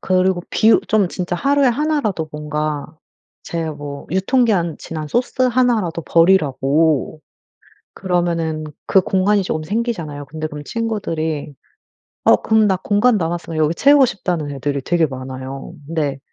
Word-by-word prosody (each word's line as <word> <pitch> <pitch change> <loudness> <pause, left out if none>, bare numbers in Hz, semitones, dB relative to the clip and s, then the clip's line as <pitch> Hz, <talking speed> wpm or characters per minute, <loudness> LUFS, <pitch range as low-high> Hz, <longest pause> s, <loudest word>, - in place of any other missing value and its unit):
그리고 185 -1 +1
비우 220 +1 +4
좀 210 -4 +3
진짜 175 -1 -3
하루에 280 +3 +2
1 300 +5 +1
라도 185 - -2
뭔가 150 -1 -3 0.6
제 165 -1 -3
뭐 145 -1 -8
유통기한 190 - +1
지난 155 -2 -6
소스 245 - -1
1 245 -2 +3
라도 170 -2 -4
버리라고. 155 -3 +2 0.8
그러면은 170 -4 -1 0.2
그 190 - +5
공간이 195 +2 +2
조금 155 -3 -3
생기잖아요. 170 -8 -3
근데 155 +3 -5
그럼 150 -1 -8
친구들이 160 -9 -3 0.7
어 - - +6
그럼 220 -1 +3
나 190 -2 +2
공간 210 +5 +2
남았으면 165 -1 -3
여기 155 +2 +2
채우고 280 +2 +5
싶다는 175 -8 -3
애들이 140 0 -2
되게 170 0 +2
많아요. 130 +2 -7
근데 150 -4 -2
170 Hz, 300 characters per minute, -19 LUFS, 150-210 Hz, 0.8 s, 어